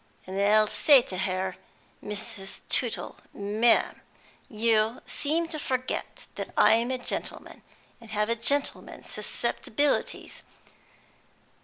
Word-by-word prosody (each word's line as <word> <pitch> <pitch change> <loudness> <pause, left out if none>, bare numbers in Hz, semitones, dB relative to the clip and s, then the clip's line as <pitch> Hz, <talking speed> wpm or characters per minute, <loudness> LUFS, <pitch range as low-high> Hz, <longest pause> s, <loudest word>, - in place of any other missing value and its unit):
and 190 +1 -3
I'll 215 +1 +5
say 270 +4 +6
to 185 - -7
her, 185 0 -2 0.5
'Mrs. 210 -1 -5
Tootle, 240 -3 -1 0.2
ma'am, 210 +4 +2 0.5
you 220 +1 +1
seem 325 +3 +1
to 310 - -4
forget 255 -3 -3
that - - -6
I'm 230 +2 +5
a 260 - -1
gentleman, 250 - -5 0.4
and 230 -2 -15
have 210 0 0
a 230 - +1
gentleman's 280 +5 -1
susceptibilities. 290 -1 -2
225 Hz, 110 wpm, -27 LUFS, 205-255 Hz, 0.5 s, say